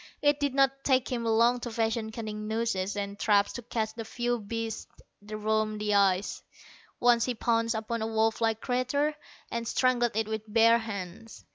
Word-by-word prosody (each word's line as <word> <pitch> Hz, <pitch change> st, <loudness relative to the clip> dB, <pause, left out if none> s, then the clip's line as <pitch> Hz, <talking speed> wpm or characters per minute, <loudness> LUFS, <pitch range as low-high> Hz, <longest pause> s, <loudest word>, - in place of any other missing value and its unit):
It 290 Hz, 0 st, +3 dB
did 285 Hz, -2 st, -1 dB
not 270 Hz, 0 st, +2 dB
take 260 Hz, -2 st, +2 dB
him 235 Hz, -2 st, -2 dB
long 230 Hz, +2 st, +3 dB
to 240 Hz, -, -5 dB
fashion 225 Hz, -1 st, -1 dB
cunning 215 Hz, -1 st, -5 dB
nooses 220 Hz, -3 st, -1 dB
and 200 Hz, 0 st, -4 dB
traps 205 Hz, -2 st, +3 dB
to 240 Hz, -, -5 dB
catch 220 Hz, -2 st, -3 dB
the 225 Hz, 0 st, -6 dB
few 240 Hz, +1 st, -2 dB
beasts 225 Hz, +1 st, -4 dB, 0.3 s
that 210 Hz, +1 st, -7 dB
roamed 215 Hz, 0 st, 0 dB
the 210 Hz, 0 st, 0 dB
ice. 195 Hz, -1 st, +2 dB, 0.6 s
Once 240 Hz, -1 st, +4 dB
he 250 Hz, -, -2 dB
pounced 230 Hz, 0 st, +1 dB
upon 220 Hz, +1 st, -3 dB
a 220 Hz, -, -1 dB
wolf 220 Hz, 0 st, +1 dB
like 225 Hz, -1 st, +1 dB
creature, 275 Hz, +4 st, 0 dB, 0.4 s
and 235 Hz, 0 st, -3 dB
strangled 245 Hz, -3 st, +2 dB
it 220 Hz, -1 st, 0 dB
with 220 Hz, -1 st, -5 dB
bare 230 Hz, +1 st, +5 dB
hands. 215 Hz, 0 st, -7 dB
225 Hz, 180 wpm, -28 LUFS, 215-240 Hz, 0.6 s, bare